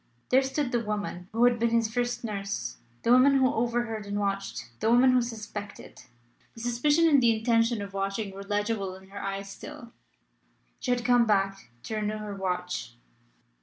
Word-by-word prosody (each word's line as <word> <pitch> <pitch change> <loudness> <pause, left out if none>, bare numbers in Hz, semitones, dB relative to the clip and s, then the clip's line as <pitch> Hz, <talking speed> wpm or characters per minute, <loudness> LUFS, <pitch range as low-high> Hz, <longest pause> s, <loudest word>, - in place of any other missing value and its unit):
There 260 +1 +5
stood 265 0 -2
the 240 -2 0
woman 205 -4 -4
who 230 +2 +1
had 245 -1 +4
been 235 +1 +2
his 230 -1 +2
first 245 +2 -2
nurse 200 -3 -4 0.3
the 235 - +3
woman 260 +3 +6
who 260 -1 +3
overheard 230 -2 -1
and 205 0 -2
watched 195 -9 -3
the 220 - +1
woman 245 +2 +6
who 255 0 +4
suspected. 215 -3 -7 0.5
The - - -11
suspicion 290 +8 +3
and 285 -4 +5
the 230 -2 +4
intention 230 -1 +2
of 200 0 -9
watching 195 +1 -2
were 195 - -8
legible 205 -1 -2
in 190 0 -15
her 200 - -7
eyes 195 0 -4
still. - - -10 0.9
She - - -4
had 245 -1 +1
come 245 -2 +4
back 195 - 0
to 220 - -4
renew 215 0 -1
her 210 -1 -6
watch. 180 -10 -3
220 Hz, 180 wpm, -28 LUFS, 200-240 Hz, 0.9 s, woman